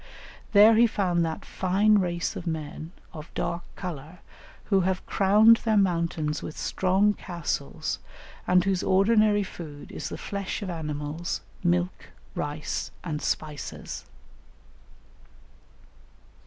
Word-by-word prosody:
There 210 Hz, +2 st, +8 dB
he 235 Hz, +1 st, +6 dB
found 180 Hz, -6 st, +1 dB
that 160 Hz, -1 st, -4 dB
fine 200 Hz, +3 st, +3 dB
race 175 Hz, -2 st, -1 dB
of 175 Hz, -, -6 dB
men, 155 Hz, 0 st, -4 dB, 0.2 s
of 155 Hz, -1 st, -9 dB
dark 175 Hz, 0 st, -2 dB
colour, 165 Hz, -1 st, -7 dB, 0.4 s
who 195 Hz, -2 st, +2 dB
have 185 Hz, 0 st, 0 dB
crowned 210 Hz, +4 st, +6 dB
their 220 Hz, -2 st, +1 dB
mountains 170 Hz, -5 st, +1 dB
with 155 Hz, -, -7 dB
strong 190 Hz, +3 st, +2 dB
castles, 170 Hz, -7 st, -3 dB, 0.5 s
and 180 Hz, 0 st, +5 dB
whose 190 Hz, -1 st, +1 dB
ordinary 205 Hz, +1 st, +4 dB
food 155 Hz, -6 st, -9 dB
is -, -, -5 dB
the -, -, -5 dB
flesh 200 Hz, +1 st, -4 dB
of 190 Hz, -, -3 dB
animals, 150 Hz, 0 st, -4 dB, 0.2 s
milk, 175 Hz, +1 st, 0 dB, 0.3 s
rice, 150 Hz, -3 st, -3 dB
and 155 Hz, -3 st, -3 dB
spices. 150 Hz, -2 st, -4 dB
180 Hz, 115 wpm, -27 LUFS, 160-200 Hz, 0.5 s, There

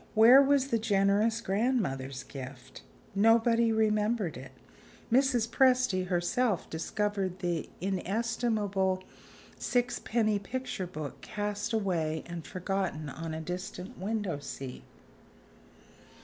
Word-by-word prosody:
Where 235 Hz, +5 st, +9 dB
was 275 Hz, -1 st, +3 dB
the 230 Hz, -, +1 dB
generous 210 Hz, +2 st, +2 dB
grandmother's 190 Hz, -, -1 dB
gift? 130 Hz, -, -9 dB, 0.3 s
Nobody 230 Hz, +2 st, +4 dB
remembered 215 Hz, -4 st, +1 dB
it; 130 Hz, +1 st, -9 dB, 0.6 s
Mrs. 245 Hz, -2 st, +3 dB
Presty 250 Hz, -8 st, +3 dB
herself 190 Hz, +4 st, 0 dB
discovered 195 Hz, +2 st, -2 dB
the 175 Hz, -3 st, -2 dB
inestimable 195 Hz, -1 st, 0 dB, 0.6 s
sixpenny 230 Hz, -3 st, 0 dB
picture 220 Hz, -3 st, -4 dB
book 155 Hz, -5 st, -7 dB
cast 205 Hz, 0 st, -3 dB
away 170 Hz, -8 st, 0 dB
and 170 Hz, -1 st, -6 dB
forgotten 185 Hz, -5 st, -2 dB
on 160 Hz, +3 st, -5 dB
a 160 Hz, -, -4 dB
distant 180 Hz, +2 st, -6 dB
window 200 Hz, -5 st, -2 dB
seat. 135 Hz, -2 st, -7 dB
200 Hz, 100 wpm, -30 LUFS, 175-225 Hz, 0.6 s, Where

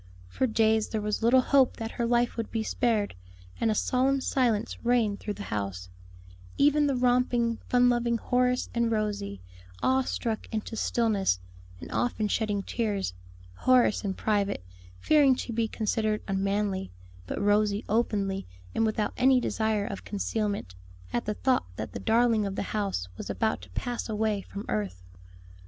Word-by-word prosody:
For 255 Hz, -, 0 dB
days 220 Hz, -1 st, +2 dB
there 220 Hz, -, -1 dB
was 210 Hz, +1 st, -2 dB
little 245 Hz, +3 st, +5 dB
hope 265 Hz, 0 st, +3 dB
that 225 Hz, 0 st, -4 dB
her 235 Hz, -, -1 dB
life 240 Hz, 0 st, +2 dB
would 230 Hz, -2 st, -3 dB
be 225 Hz, -1 st, -2 dB
spared, 220 Hz, -3 st, 0 dB, 0.5 s
and 230 Hz, -, +2 dB
a 215 Hz, -, +1 dB
solemn 265 Hz, +5 st, +2 dB
silence 235 Hz, -5 st, 0 dB
reigned 235 Hz, -4 st, +2 dB
through 210 Hz, -, -4 dB
the 205 Hz, -, -7 dB
house; 95 Hz, -3 st, -3 dB, 0.7 s
even 295 Hz, +1 st, +4 dB
the 275 Hz, -, +1 dB
romping, 245 Hz, -2 st, +2 dB
fun 245 Hz, 0 st, +5 dB
loving 240 Hz, -1 st, +2 dB
Horace 250 Hz, +2 st, +1 dB
and 235 Hz, -1 st, +1 dB
Rosie, 205 Hz, -, -2 dB, 0.4 s
awe 260 Hz, 0 st, +3 dB
struck 230 Hz, -3 st, -3 dB
into 220 Hz, +1 st, -3 dB
stillness, 210 Hz, -, +1 dB, 0.4 s
and -, -, -9 dB
often 230 Hz, -3 st, 0 dB
shedding 205 Hz, -2 st, 0 dB
tears 205 Hz, -, -2 dB, 0.4 s
Horace 245 Hz, -, +3 dB
in 195 Hz, -2 st, -2 dB
private, 200 Hz, -, 0 dB, 0.3 s
fearing 285 Hz, -, +5 dB
to 240 Hz, -, -5 dB
be 225 Hz, 0 st, +1 dB
considered 215 Hz, -1 st, -1 dB
unmanly, 195 Hz, 0 st, -1 dB, 0.4 s
but -, -, -3 dB
Rosie 205 Hz, +1 st, +2 dB
openly 200 Hz, -3 st, 0 dB, 0.3 s
and 225 Hz, -, +2 dB
without 215 Hz, -1 st, -1 dB
any 260 Hz, +1 st, +5 dB
desire 220 Hz, -3 st, 0 dB
of 200 Hz, -3 st, -6 dB
concealment 205 Hz, -, -2 dB, 0.4 s
at 120 Hz, -, -1 dB
the 210 Hz, -, -2 dB
thought 260 Hz, -, +1 dB
that -, -, -5 dB
the -, -, -6 dB
darling 225 Hz, -2 st, +3 dB
of 195 Hz, -, -4 dB
the -, -, -2 dB
house 200 Hz, -, -1 dB
was -, -, -6 dB
about -, -, 0 dB
to 95 Hz, -, -13 dB
pass 240 Hz, -, -4 dB
away 215 Hz, -1 st, 0 dB
from 200 Hz, +1 st, -8 dB
earth. 95 Hz, -4 st, -3 dB
220 Hz, 160 wpm, -28 LUFS, 205-240 Hz, 0.7 s, little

